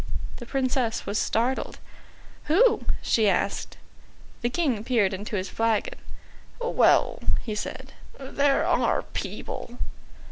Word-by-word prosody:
The 240 - -9
Princess 255 -3 0
was 205 +1 -1
startled. 245 +4 0 0.7
"Who?" 435 +8 +4 0.2
she 220 -3 +3
asked. 185 - -1 0.6
The 240 - +1
King 255 -7 0
peered 220 -6 +2
into 205 +3 -4
his 190 -1 -1
flagon. 230 - 0 0.6
"Well," 485 0 +3 0.2
he 220 - -3
said, 260 +5 -5 0.3
"there 275 +1 +2
are - - +2
people." 240 0 -6
240 Hz, 110 wpm, -26 LUFS, 215-275 Hz, 0.7 s, Who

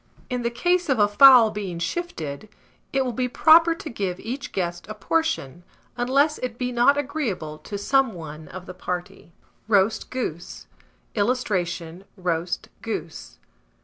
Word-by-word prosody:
In 250 -1 -1
the 235 - 0
case 355 +7 0
of 265 - +3
a 205 -1 +5
fowl 240 0 +8
being 195 -5 -5
shifted, 170 - -4 0.4
it 270 -1 +1
will 250 - -1
be 250 +2 -1
proper 330 +5 +5
to 330 - -9
give 195 -8 -3
each 270 +6 -6
guest 175 -2 -3
a 215 - -5
portion, 205 - -1 0.3
unless 275 +5 +2
it 250 -2 -4
be 250 0 -2
not 245 +4 +4
agreeable 255 - -3
to 205 - -6
some 265 +3 +2
one 155 -2 -9
of 185 -1 -9
the 185 - -8
party. 180 -1 -6 0.4
ROAST 215 0 +2
GOOSE. 175 -10 -5 0.5
[Illustration: 185 -7 -1
ROAST 175 -1 -2
GOOSE. - - -6
220 Hz, 145 wpm, -24 LUFS, 180-270 Hz, 0.5 s, fowl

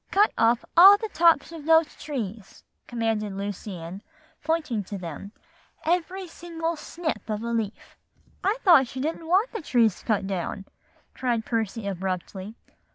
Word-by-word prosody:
"'Cut 410 +2 +4
off 230 +1 +2
all 385 +4 +10
the 440 +1 -5
tops 335 -2 +4
of 320 -3 -9
those 320 -1 +4
trees,' 220 -8 -6 0.2
commanded 225 -3 -1
Lucy 200 0 -5
Ann, 170 +4 -8 0.4
pointing 305 -9 -1
to 200 - -6
them, 175 +2 -7 0.5
'every 360 +3 -1
single 330 0 -4
snip 315 -3 -5
of 215 +1 -2
a 235 - -3
leaf.'" 225 -2 -4 0.5
"I 405 +5 +1
thought 325 - +6
she 260 - -7
didn't 320 +3 -3
want 385 +8 +3
the 450 - -5
trees 230 - +2
cut 210 -4 0
down," 195 +1 -4 0.5
cried 240 -3 -1
Percy 225 -1 -2
abruptly. 190 +2 -4
235 Hz, 150 wpm, -26 LUFS, 205-330 Hz, 0.5 s, all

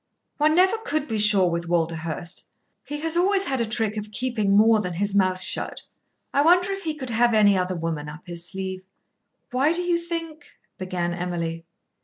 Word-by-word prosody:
One 305 +1 +3
never 380 +5 +4
could 310 -9 -2
be 220 -2 -2
sure 205 -3 +4
with 170 0 -2
Walderhurst. 165 0 -2 0.3
He 295 0 -6
has 325 +1 -1
always 385 +3 +3
had 265 -8 -1
a 230 - 0
trick 220 -1 -1
of 210 0 -5
keeping 235 -3 -1
more 220 +1 +6
than 180 -4 -3
his 200 +3 -1
mouth 185 -2 +2
shut. - - -3 0.5
I 280 - +4
wonder 360 +5 +4
if 390 0 -4
he 315 -1 -1
could 260 -5 -6
have 235 0 +3
any 205 -2 +5
other 185 0 0
woman 160 -3 -3
up 155 +2 -10
his 170 -2 -6
sleeve?" 190 +1 -5 0.7
"Why 270 +6 +2
do 350 - -2
you 350 -1 +1
think 335 -2 -6
" - - -44
began 180 -2 -2
Emily. 170 -2 -3
210 Hz, 195 wpm, -24 LUFS, -, 0.7 s, more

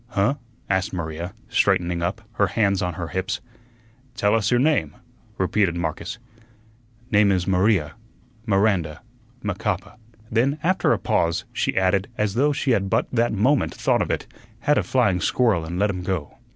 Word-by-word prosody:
"Huh?" 115 +1 +1 0.3
asked 95 +2 0
Maria, 85 0 -5
straightening 85 -1 +1
up, 95 +6 -2
her 105 -3 +1
hands 100 0 +1
on 90 -2 -2
he 85 -1 -6
hips. 95 +1 -2 0.8
"Tell 105 -1 +2
us 110 -2 +2
your 120 - +3
name," 130 - +1 0.4
repeated 95 -1 +1
Marcus. 80 -3 -3 0.9
"Name 100 -1 +5
is 90 -2 +1
Maria 95 -4 +2 0.6
Miranda 95 -7 +1 0.4
Macapa." 100 0 -3 0.3
Then, 130 +6 +2
after 185 +3 +2
a - - +3
pause, 85 0 0
she - - -1
added, 95 +1 +2
as 105 -2 0
though 140 +6 +3
she 135 -2 0
had 100 -4 +1
but - - +2
that 120 0 +2
moment 130 +8 +1
thought - - +1
of - - -1
it, - - -1 0.4
"Had 150 +3 +3
a - - +2
flying 100 -9 +1
squirrel 110 -10 +2
an' 85 +2 -4
let 100 +2 +2
him 90 -2 -5
go." 90 -5 -4
100 Hz, 165 wpm, -23 LUFS, 90-110 Hz, 0.9 s, Name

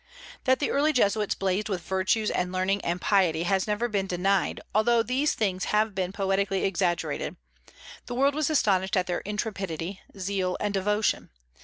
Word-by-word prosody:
That 260 -1 +4
the 285 - -1
early 300 +2 +2
Jesuits 210 -4 +2
blazed 195 +3 -1
with 185 -4 -2
virtues 190 +4 +1
and 180 0 -1
learning 185 +2 0
and 175 +1 -1
piety 175 -5 +2
has 190 +2 +1
never 210 +3 0
been 200 -4 -1
denied, 190 +1 +1
although 230 +2 +3
these 265 +6 0
things 190 -4 -1
have 215 0 +1
been 185 -1 -2
poetically 195 0 0
exaggerated. 180 -3 -1 0.7
The 245 - -4
world 275 +3 +3
was 305 +1 0
astonished 195 -10 +2
at 185 - +2
their 175 -1 -1
intrepidity, 195 -4 -4 0.2
zeal, 190 -1 -1
and 205 -1 -1
devotion. 210 +2 0
195 Hz, 165 wpm, -27 LUFS, 185-215 Hz, 0.7 s, That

